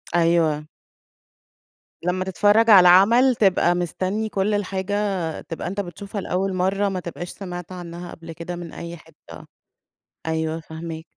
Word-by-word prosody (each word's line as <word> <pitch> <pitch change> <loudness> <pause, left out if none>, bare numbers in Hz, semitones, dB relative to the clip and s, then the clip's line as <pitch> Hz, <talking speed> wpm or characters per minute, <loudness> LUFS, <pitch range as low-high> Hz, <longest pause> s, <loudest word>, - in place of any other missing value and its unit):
أيوه. 165 -3 +2 1.4
لمّا 185 +1 -1
تتفرّج 210 +4 +3
على 200 -3 +10
العمل، 235 +8 +6
تبقى 180 -4 +3
مستنّي 185 +5 -2
كل 200 +1 0
الحاجة 195 0 -2 0.5
تبقى 165 - -6
أنت 195 +3 -4
بتشوفها 200 +2 -5
لأول 190 +1 -1
مرّة، 195 +2 +1
ما 185 -1 -3
تبقاش 175 0 -7
سمعت 180 -2 -7
عنها 175 -1 -8
قبل 165 0 -10
كده 170 +2 -6
من 175 -2 -8
أي 170 0 -7
حتّة. 160 0 -14 0.8
أيوه، 160 0 -1
فاهماك. 160 0 -8
180 Hz, 135 wpm, -23 LUFS, 170-195 Hz, 1.4 s, على